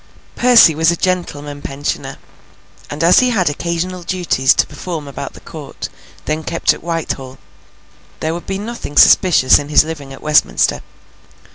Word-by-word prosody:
Percy 240 Hz, -9 st, +6 dB
was 160 Hz, +2 st, +2 dB
a 170 Hz, -, +2 dB
Gentleman 150 Hz, -6 st, -3 dB
Pensioner, 140 Hz, +1 st, -5 dB, 0.7 s
and 150 Hz, +3 st, -4 dB
as 170 Hz, +2 st, +6 dB
he 255 Hz, -, +2 dB
had 185 Hz, -10 st, +1 dB
occasional 170 Hz, +4 st, -4 dB
duties 170 Hz, -7 st, 0 dB
to -, -, +2 dB
perform 165 Hz, -5 st, -7 dB
about 140 Hz, -, -7 dB
the -, -, -13 dB
Court, -, -, -9 dB, 0.4 s
then 155 Hz, +1 st, -2 dB
kept 170 Hz, +2 st, 0 dB
at -, -, -11 dB
Whitehall, 150 Hz, -6 st, -5 dB, 0.8 s
there 160 Hz, +1 st, -2 dB
would 170 Hz, -, -8 dB
be 195 Hz, -, -3 dB
nothing 210 Hz, -8 st, -7 dB
suspicious 170 Hz, -9 st, +5 dB
in 145 Hz, 0 st, -7 dB
his 150 Hz, -, +5 dB
living 150 Hz, -4 st, -8 dB
at 135 Hz, -, -12 dB
Westminster. 155 Hz, 0 st, +2 dB
165 Hz, 155 wpm, -16 LUFS, 145-180 Hz, 0.8 s, Percy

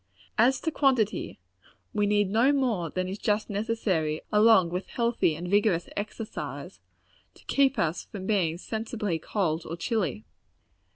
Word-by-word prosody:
As 250 Hz, +4 st, +4 dB
to 320 Hz, -, -1 dB
quantity, 255 Hz, -8 st, +1 dB, 0.6 s
we 210 Hz, -1 st, +1 dB
need 205 Hz, -1 st, +2 dB
no 235 Hz, +6 st, +4 dB
more 240 Hz, -, 0 dB
than 185 Hz, +3 st, -2 dB
is 195 Hz, +2 st, -5 dB
just 210 Hz, 0 st, 0 dB
necessary, 200 Hz, -7 st, -1 dB
along 210 Hz, -4 st, +5 dB
with 180 Hz, +2 st, -3 dB
healthy 235 Hz, -9 st, +1 dB
and 175 Hz, +3 st, -6 dB
vigorous 200 Hz, -3 st, +2 dB
exercise, 215 Hz, +1 st, -6 dB, 0.6 s
to -, -, -20 dB
keep 275 Hz, -1 st, +2 dB
us 165 Hz, +1 st, -1 dB
from 195 Hz, -3 st, -8 dB
being 180 Hz, -6 st, +1 dB
sensibly 215 Hz, -3 st, -3 dB
cold 165 Hz, -4 st, -1 dB
or 165 Hz, -, -6 dB
chilly. 180 Hz, -, -2 dB
205 Hz, 140 wpm, -27 LUFS, 175-225 Hz, 0.6 s, along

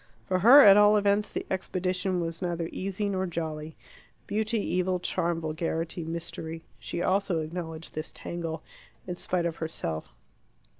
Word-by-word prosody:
For 185 Hz, -1 st, +1 dB
her, 245 Hz, +9 st, +9 dB
at 200 Hz, -5 st, +9 dB
all 210 Hz, 0 st, +7 dB
events, 205 Hz, +1 st, +2 dB
the -, -, -3 dB
expedition 185 Hz, -1 st, -1 dB
was 165 Hz, -1 st, -4 dB
neither 170 Hz, -2 st, -2 dB
easy 195 Hz, +2 st, -2 dB
nor 190 Hz, -1 st, -1 dB
jolly. 160 Hz, -2 st, -4 dB, 0.5 s
Beauty, 220 Hz, +2 st, 0 dB
evil, 185 Hz, -2 st, 0 dB
charm, 170 Hz, -1 st, -1 dB
vulgarity, 165 Hz, +1 st, -2 dB
mystery 165 Hz, 0 st, -5 dB, 0.2 s
she 175 Hz, -, -4 dB
also 195 Hz, -2 st, +1 dB
acknowledged 160 Hz, 0 st, -6 dB
this 155 Hz, +1 st, -5 dB
tangle, 165 Hz, -2 st, -5 dB, 0.4 s
in 180 Hz, -, -3 dB
spite 175 Hz, 0 st, -1 dB
of 165 Hz, -1 st, -2 dB
herself. 85 Hz, -, -4 dB
175 Hz, 145 wpm, -28 LUFS, 165-190 Hz, 0.5 s, her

